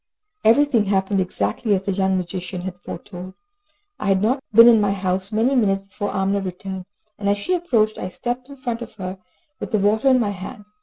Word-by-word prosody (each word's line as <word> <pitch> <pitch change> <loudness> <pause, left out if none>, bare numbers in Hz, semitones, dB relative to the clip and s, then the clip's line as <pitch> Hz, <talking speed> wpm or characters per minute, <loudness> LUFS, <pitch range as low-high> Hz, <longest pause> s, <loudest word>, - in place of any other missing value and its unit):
Everything 235 -1 +4
happened 195 0 +1
exactly 180 - 0
as 190 - -2
the 200 - -1
young 190 0 +1
magician 180 0 -4
had 180 0 -6
foretold. 180 +1 -8 0.6
I 205 - -3
had 195 -1 +3
not 260 +5 +1
been 230 +2 +9
in 230 -3 +7
my 200 -1 +2
house 190 +1 -2
many 225 +5 +2
minutes 195 -6 +2
before 205 +1 -5
Amina 195 +1 0
returned, 190 0 -6 0.3
and 200 -1 0
as 205 - +2
she 205 - -1
approached 235 -12 +1
I 185 - -4
stepped 245 +6 -4
in 280 - -11
front 240 -3 -4
of 230 - -8
her, 190 -1 -6 0.4
with - - -5
the 215 - +1
water 210 +5 +2
in 260 -1 +6
my 210 -4 0
hand. 205 +3 -8
200 Hz, 205 wpm, -22 LUFS, 190-230 Hz, 0.6 s, been